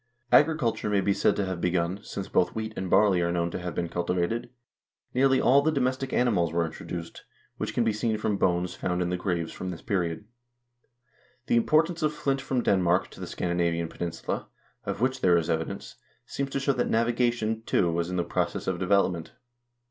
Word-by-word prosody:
Agriculture 145 Hz, -9 st, +3 dB
may 100 Hz, -1 st, +2 dB
be 100 Hz, +1 st, +2 dB
said -, -, +2 dB
to 100 Hz, -, 0 dB
have 95 Hz, -2 st, -4 dB
begun, 90 Hz, +2 st, 0 dB
since 100 Hz, -2 st, -6 dB
both 90 Hz, -, +1 dB
wheat 110 Hz, 0 st, -3 dB
and 95 Hz, -1 st, -4 dB
barley 100 Hz, -3 st, +4 dB
are 85 Hz, 0 st, +1 dB
known 85 Hz, 0 st, 0 dB
to -, -, -4 dB
have 90 Hz, -1 st, -5 dB
been 85 Hz, -, -1 dB
culti 85 Hz, +1 st, -2 dB
vated. 90 Hz, +7 st, -1 dB, 0.6 s
Nearly 135 Hz, +1 st, +4 dB
all 135 Hz, +3 st, +5 dB
the 155 Hz, +2 st, +2 dB
domestic 130 Hz, -2 st, -1 dB
animals 100 Hz, -10 st, +2 dB
were 85 Hz, 0 st, +1 dB
introduced, 85 Hz, +1 st, -7 dB, 0.3 s
which -, -, -4 dB
can 120 Hz, -, +3 dB
be 110 Hz, -1 st, +1 dB
seen 110 Hz, +1 st, 0 dB
from 105 Hz, -1 st, -1 dB
bones 90 Hz, -1 st, +1 dB
found 90 Hz, -1 st, -1 dB
in 90 Hz, -, -2 dB
the -, -, +1 dB
graves 90 Hz, -3 st, -2 dB
from 95 Hz, -, -5 dB
this 85 Hz, -, -7 dB
period. 95 Hz, -3 st, -1 dB, 1.2 s
The -, -, +1 dB
importation 160 Hz, +7 st, +2 dB
of 150 Hz, 0 st, +2 dB
flint 135 Hz, -2 st, -1 dB
from 130 Hz, -3 st, -1 dB
Denmark 90 Hz, -2 st, +2 dB
to -, -, -13 dB
the -, -, -5 dB
Scandinavian 85 Hz, -1 st, -1 dB
peninsula, 85 Hz, -1 st, -4 dB, 0.4 s
of -, -, -3 dB
which 130 Hz, +1 st, 0 dB
there 90 Hz, -2 st, +5 dB
is 85 Hz, -, 0 dB
evidence, 80 Hz, 0 st, -4 dB, 0.3 s
seems 140 Hz, 0 st, -3 dB
to 135 Hz, -, -2 dB
show 135 Hz, 0 st, +1 dB
that 125 Hz, -, -1 dB
navigation, 115 Hz, -1 st, +1 dB
too, 85 Hz, -2 st, +2 dB
was 85 Hz, +1 st, -1 dB
in 90 Hz, -, -3 dB
the 90 Hz, -, +1 dB
process -, -, -2 dB
of 95 Hz, -2 st, -1 dB
development. 90 Hz, -3 st, +1 dB
95 Hz, 200 wpm, -27 LUFS, 85-120 Hz, 1.2 s, all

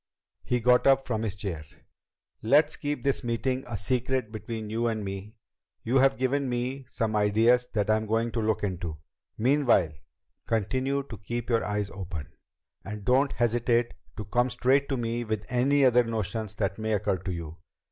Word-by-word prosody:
He 125 Hz, -, 0 dB
got 125 Hz, +2 st, +4 dB
up 135 Hz, 0 st, +4 dB
from 110 Hz, -3 st, -1 dB
his 105 Hz, -4 st, -2 dB
chair. 95 Hz, -6 st, -4 dB, 0.8 s
"Let's 140 Hz, +8 st, +4 dB
keep 145 Hz, -4 st, -3 dB
this 140 Hz, -1 st, 0 dB
meeting 125 Hz, +2 st, -1 dB
a 120 Hz, -3 st, -3 dB
secret 125 Hz, +2 st, -1 dB
between 110 Hz, 0 st, -5 dB
you 115 Hz, +2 st, -1 dB
and 110 Hz, -3 st, -2 dB
me. 100 Hz, +3 st, -6 dB, 0.5 s
You've 135 Hz, +3 st, +3 dB
given 130 Hz, +1 st, 0 dB
me 125 Hz, +2 st, -3 dB
some 110 Hz, -2 st, -1 dB
ideas 110 Hz, +4 st, +3 dB
that 105 Hz, -3 st, +1 dB
I'm 110 Hz, 0 st, +1 dB
going 115 Hz, +2 st, 0 dB
to 115 Hz, -, -1 dB
look 110 Hz, -1 st, 0 dB
into. 90 Hz, -5 st, -3 dB, 0.4 s
Meanwhile, 120 Hz, -, +3 dB, 0.6 s
continue 130 Hz, +6 st, 0 dB
to 115 Hz, -5 st, -9 dB
keep 120 Hz, +4 st, -4 dB
your 115 Hz, -1 st, +2 dB
eyes 105 Hz, -1 st, -2 dB
open. 90 Hz, -6 st, -7 dB, 0.5 s
And 105 Hz, 0 st, -7 dB
don't 130 Hz, +3 st, +3 dB
hesitate 120 Hz, 0 st, +1 dB, 0.2 s
to 110 Hz, -, -5 dB
come 120 Hz, +4 st, +1 dB
straight 130 Hz, +3 st, +2 dB
to 135 Hz, -, 0 dB
me 120 Hz, 0 st, -2 dB
with 110 Hz, -2 st, -3 dB
any 135 Hz, +3 st, +3 dB
other 125 Hz, -1 st, +5 dB
notions 110 Hz, -2 st, -3 dB
that 100 Hz, -1 st, -2 dB
may 110 Hz, 0 st, -1 dB
occur 100 Hz, -2 st, 0 dB
to 95 Hz, +1 st, -4 dB
you." 85 Hz, -2 st, -6 dB
115 Hz, 170 wpm, -27 LUFS, 105-125 Hz, 0.8 s, other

